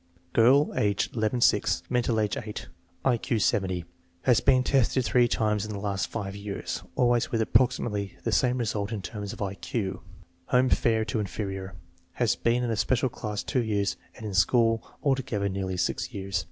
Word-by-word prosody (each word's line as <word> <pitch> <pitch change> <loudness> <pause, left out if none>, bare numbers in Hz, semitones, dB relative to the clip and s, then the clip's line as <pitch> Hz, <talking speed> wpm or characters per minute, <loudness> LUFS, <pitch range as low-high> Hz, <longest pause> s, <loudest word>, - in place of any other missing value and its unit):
Girl, 130 +6 +5
age 100 -1 +1
ll 110 +2 0
C>; - - +5 0.3
mental 120 -2 +1
age 105 -2 0
S; 105 -1 -6 0.4
I 125 -3 +4
Q 115 - -1
70. 95 -4 0 0.4
lias 125 -3 +5
been 130 -2 +4
tested 130 -1 +2
three 120 0 +4
times 105 -3 0
in 110 - -5
the 100 - -4
last 100 -2 -1
five 100 -3 -5
years, 100 0 -5
always 120 -1 +2
with 115 - 0
approximately 110 -4 +1
the 115 - -1
same 125 +4 +2
result 105 -3 -2
in 105 -4 -4
terms 105 -1 -5
of - - -5
I 95 -1 -3
Q. 100 -1 -4 0.5
Home 125 +1 +3
fair 110 -2 +2
to 110 - -2
inferior* 95 -2 -4 0.4
Has 120 +2 +1
been 120 +1 +1
in 120 - -1
a 110 - -1
special 130 +3 +1
class 105 -3 -4
two 130 - 0
years 100 -3 0 0.2
and 110 - -9
in 105 - -4
school 115 +4 +3 0.2
altogether 130 -7 0
nearly 95 -1 -3
six 90 - -1
years. 95 -2 -2
110 Hz, 180 wpm, -27 LUFS, 100-120 Hz, 0.5 s, Girl